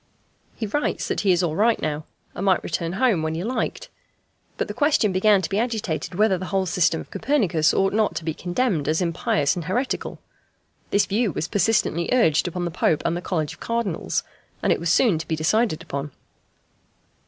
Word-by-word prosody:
He 225 - -3
writes 290 +8 -1
that - - -1
he 195 - +3
is 180 0 +2
all 160 -3 -1
right 220 +4 +3
now, 155 0 -3 0.3
and 185 - -5
might 190 -3 +2
return 165 +1 -2
home 215 -4 +2
when 160 0 -2
he 165 - -3
liked. 250 +5 -3 0.7
But - - -1
the - - -5
question 290 -8 +2
began 190 +1 +3
to - - 0
be 200 - 0
agitated 200 - -2
whether 200 -2 +3
the 185 - -5
whole 190 -1 0
system 170 -2 +1
of - - -10
Copernicus 195 - +2
ought 195 0 +1
not 215 0 +1
to 165 - -4
be 160 - -1
condemned 175 - -1
as 155 +1 +1
impious 165 -4 +1
and 175 -3 -5
heretical. 245 - -2 0.7
This 200 0 +3
view 215 +1 0
was 160 - -3
persistently 195 -4 +1
urged 170 -11 +3
upon 175 0 -3
the 170 - -3
Pope 155 -1 +1
and 175 +1 -1
College 155 -5 -2
of - - -16
Cardinals, 230 -7 -2 0.4
and - - +4
it - - -3
was 170 0 -2
soon 180 -1 +3
to 160 - -7
be 160 - 0
decided 165 +1 +1
upon. 140 -3 -4
180 Hz, 200 wpm, -23 LUFS, 160-215 Hz, 0.7 s, and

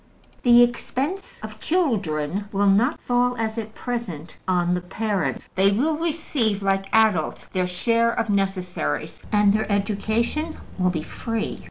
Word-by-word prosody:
The 240 -1 +7
expense 270 +9 -2
of 215 0 -8
children 200 - 0
will 200 0 +1
not 210 +9 +3
fall, 245 0 +1
as 225 0 -2
at 220 0 -7
present, 185 - -5
on 180 -1 +2
the 180 - -1
parents. 200 +2 -2
They 190 +1 +4
will 275 +11 +1
receive, 295 -10 -1
like 195 0 +1
adults, 215 -8 +2
their 185 -1 +1
share 230 +6 +2
of 230 0 -1
necessaries, 185 - -2
and 205 -1 +4
their 215 0 0
education 220 +10 -1 0.2
will 180 0 +3
be 160 -3 -2
free. 225 +6 -4
215 Hz, 145 wpm, -23 LUFS, 190-240 Hz, 0.2 s, The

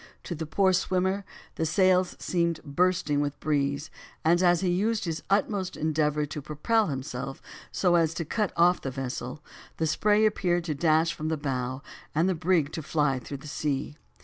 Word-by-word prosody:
To - - -4
the 160 -1 -5
poor 190 +3 +3
swimmer 190 +2 +1 0.3
the 160 - 0
sails 185 +1 +3
seemed 170 -2 -1
bursting 150 -1 +1
with 145 -1 -1
the - - -37
breeze, 140 -1 0 0.3
and 170 +2 +4
as 175 -1 +4
he 185 - +1
used 205 +4 +1
his 165 -2 -3
utmost 195 -1 0
endeavor 150 -1 +1
to 150 +1 -6
propel 180 - +1
himself 135 -1 -5 0.3
so 180 -2 +2
as 165 -2 +3
to 165 - -3
cut 210 +4 -1
off 175 +1 +4
the 135 - -3
vessel, 130 +2 -5 0.3
the 160 - 0
spray 210 +7 +3
appeared 175 -5 +1
to 165 -3 -2
dash 160 +2 +2
from 155 -2 -5
the 160 0 0
bow 130 -2 -3 0.3
and 165 +4 +3
the 190 - +2
brig 160 -3 +1
to 160 - -4
fly 145 -3 +1
through 140 +3 -7
the - - -7
sea. 145 -1 -2
160 Hz, 185 wpm, -27 LUFS, 145-180 Hz, 0.3 s, and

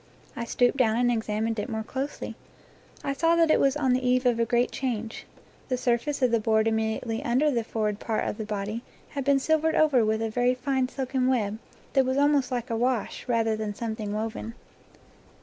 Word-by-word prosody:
I 235 - -3
stooped 245 +2 +2
down 225 -4 +3
and 245 0 +3
examined 220 0 -1
it 210 - -3
more 220 -1 -3
closely. 270 +5 -5 0.7
I 275 - -1
saw 330 +4 +2
that 330 -2 +4
it - - +4
was 275 +1 +3
on 265 -4 +2
the 255 +1 0
eve 250 0 +2
of 240 -2 +3
a 230 - +3
great 240 +1 +1
change. 230 -4 -4 0.4
The 255 - 0
surface 250 +3 0
of 250 - +4
the 230 - +3
board 220 0 +2
immediately 220 +1 -1
under 260 +6 +2
the 235 -3 0
forward 215 -2 -2
part 220 -2 -1
of 210 - -4
the - - -2
body 210 +2 -3 0.3
had 280 -2 -4
been 280 +1 +4
silvered 315 +3 +1
over 290 -6 +4
with 220 +1 0
a 225 - -1
very 245 +2 +2
fine 260 0 0
silken 260 -1 -1
web 220 -5 0 0.3
that 270 - +4
was 260 +1 -1
almost 285 -2 +3
like 245 -1 -3
a - - 0
wash, 245 +1 -1
rather 225 -2 +1
than 215 -1 -4
something 220 -2 -4
woven. 220 +2 -4
240 Hz, 205 wpm, -27 LUFS, 220-265 Hz, 0.7 s, that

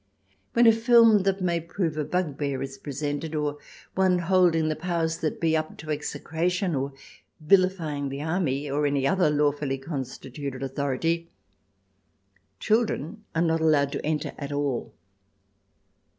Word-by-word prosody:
When 235 0 +5
a 225 - +9
film 230 -1 +6
that 195 0 +1
may 170 -2 +1
prove 170 -1 -2
a 155 - -1
bugbear 145 -5 -2
is 135 0 -7
presented, 145 +2 -4
or 150 -1 -2 0.3
one 185 -1 +3
holding 175 -2 +3
the 155 - 0
powers 165 -1 -1
that 155 - -2
be 160 -1 +2
up 155 0 -2
to 155 0 -6
execration 170 +4 -1
or 135 0 -2 0.5
vilifying 160 -4 +2
the 140 +2 -5
Army, 155 -4 -1
and 145 +1 +1
any 140 -1 0
other 185 +1 +3
lawfully 145 -2 +1
con 135 +1 -4
stituted 130 +1 -7
authority, 145 +5 -1 1.3
children 215 - 0
are 165 - +2
not 165 -1 +1
allowed 145 -3 +3
to - - -4
enter 150 -1 -2
at 140 -1 -5
all. 145 -4 -2
155 Hz, 145 wpm, -26 LUFS, 145-175 Hz, 1.3 s, a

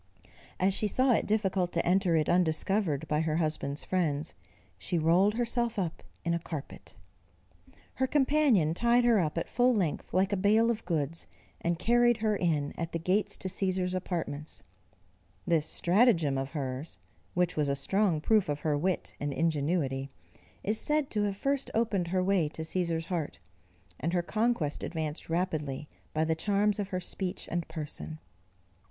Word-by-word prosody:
As 190 +1 +3
she 210 - 0
saw 255 +5 +2
it - - +1
difficult 195 -4 +1
to 170 - 0
enter 180 -1 +3
it 155 -2 +2
undiscovered 170 -2 +1
by 150 +1 +1
her 160 -1 0
husband's 155 -3 -1
friends, 160 -4 -1 0.5
she 175 - -2
rolled 175 +6 +3
herself 235 -1 -1
up 175 -4 -2 0.2
in 170 - +1
a 170 - 0
carpet. 155 -3 -8 1.0
Her 260 - 0
companion 270 - +3
tied 235 +5 +3
her 235 -3 +5
up 160 -2 -1
at 165 - -1
full 250 0 +3
length 175 -8 -1
like 190 +3 +2
a - - +1
bale 215 +4 +4
of 225 -1 -5
goods, 165 -2 -2 0.4
and 170 0 +1
carried 240 +5 +3
her 215 -1 +1
in 155 -6 0
at 165 -1 -3
the - - +1
gates 185 +5 +1
to - - -3
Cæsar's 185 -1 -1
apartments. 165 -5 -4 0.8
This 160 -3 +2
stratagem 175 - +3
of 135 +2 -3
hers, 135 0 -4 0.4
which 180 0 +1
was 150 -2 +1
a 140 - +1
strong 175 +3 +1
proof 210 0 +3
of 145 0 -2
her 150 -2 +1
wit 180 +5 -1
and 145 0 -2
ingenuity, 145 -3 0 0.5
is 215 +2 +1
said 300 -2 0
to 210 -1 +1
have 200 -1 -2
first 275 +3 -1
opened 210 -6 +1
her 185 +1 +1
way 185 -5 +2
to 160 - -6
Cæsar's 165 -1 -1
heart, 165 -5 -3 0.6
and 165 +5 -1
her 175 -1 +1
conquest 215 -6 0
advanced 160 -2 -2
rapidly 155 -5 -2 0.2
by 155 - +1
the 160 0 +1
charms 205 +4 +1
of 200 - -1
her 185 -2 -2
speech 185 0 -4
and 170 -1 -2
person. 155 0 -5
175 Hz, 170 wpm, -30 LUFS, 155-205 Hz, 1.0 s, her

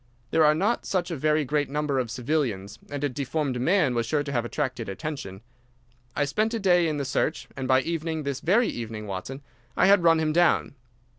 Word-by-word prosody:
There 160 - +4
are 150 0 +5
not 210 +9 0
such 180 -2 -1
a - - -2
very 150 +1 +1
great 145 +1 0
number 145 -1 -1
of 125 -3 -2
civilians, 120 -6 -2
and 145 0 -5
a - - +3
deformed 140 -1 -2
man 160 -3 +3
was 115 -1 -1
sure 145 +3 +1
to 140 - -5
have 120 -4 0
attracted 130 -3 -3
attention. 100 -5 -6 0.7
I 145 - +1
spent 215 +11 0
a - - -1
day 180 -4 +3
in 155 -2 -1
the 140 - -2
search, 150 +4 -1
and 130 -1 -4
by 130 0 +4
evening—this 160 -3 -3
very 215 +8 +3
evening, 110 -2 -5
Watson—I 120 - -4
had 200 0 +6
run 165 -1 +5
him 155 -1 0
down. 175 -3 +3
145 Hz, 200 wpm, -26 LUFS, 125-160 Hz, 0.7 s, had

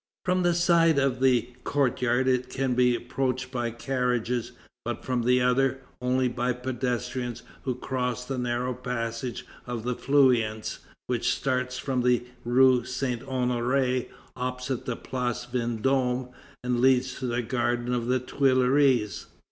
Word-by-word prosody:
From 180 +1 +2
the 175 -1 +2
side 170 -2 +4
of 135 -2 +1
the 125 -3 +3
courtyard 125 -2 +1
it 125 -1 +1
can 130 -1 -1
be 125 0 +3
approached 130 +1 -2
by 120 -2 -1
carriages, 125 -1 -1 0.3
but - - -4
from 125 -1 0
the 125 +2 +3
other, 130 +1 +2 0.2
only 130 +1 +2
by 125 +1 -1
pedestrians 125 -1 -3 0.2
who 130 -2 0
cross 125 -1 -2
the 130 0 -3
narrow 125 +1 -1
passage 120 -1 -4 0.2
of 120 -2 -4
the 125 +1 -1
Feuillants, 120 -6 +2 0.3
which 120 -2 0
starts 125 -1 -1
from 130 -2 -1
the 125 -1 +2 0.2
rue 125 0 +5
Saint 125 -1 -2
Honoré, 125 0 0 0.3
opposite 125 0 -3
the 125 - -1
Place 125 -1 -3
Vendôme, 125 +1 0 0.3
and 125 -1 0
leads 130 0 +3
to 130 - -2
the 120 0 -1
garden 120 0 -1
of 120 -1 -1
the 130 +1 +3
Tuileries. 130 -4 +2
125 Hz, 140 wpm, -27 LUFS, 120-130 Hz, 0.3 s, rue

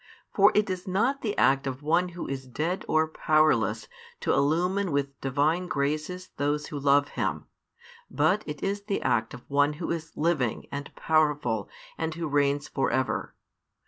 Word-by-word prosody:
For 200 +1 +6
it 210 0 +3
is 185 -1 -4
not 235 +9 +1
the 210 -3 -2
act 135 +1 +3
of 135 +2 -5
one 170 +4 +2
who - - -4
is 135 -1 -5
dead, 160 +9 -2
or 160 0 +3
powerless 155 0 +2 0.3
to - - +1
illumine 175 +6 +1
with 140 -1 -2
Divine 150 +7 +1
graces 155 +5 -2
those 145 +1 0
who 145 - -5
love 140 +1 +3
him, - - -2 0.6
but 205 +3 +2
it 150 -1 -6
is 200 +1 -2
the 200 -2 -2
act 110 0 0
of 125 - -14
One 145 +1 +2
Who 165 +3 -4
is 160 -1 -5
living 150 -8 0
and 140 0 -5
powerful 150 -9 +1 0.3
and 160 -1 -2
Who 165 -1 -3
reigns 145 0 +1
for 135 - 0
ever. 130 -1 -1
150 Hz, 170 wpm, -27 LUFS, 140-180 Hz, 0.6 s, For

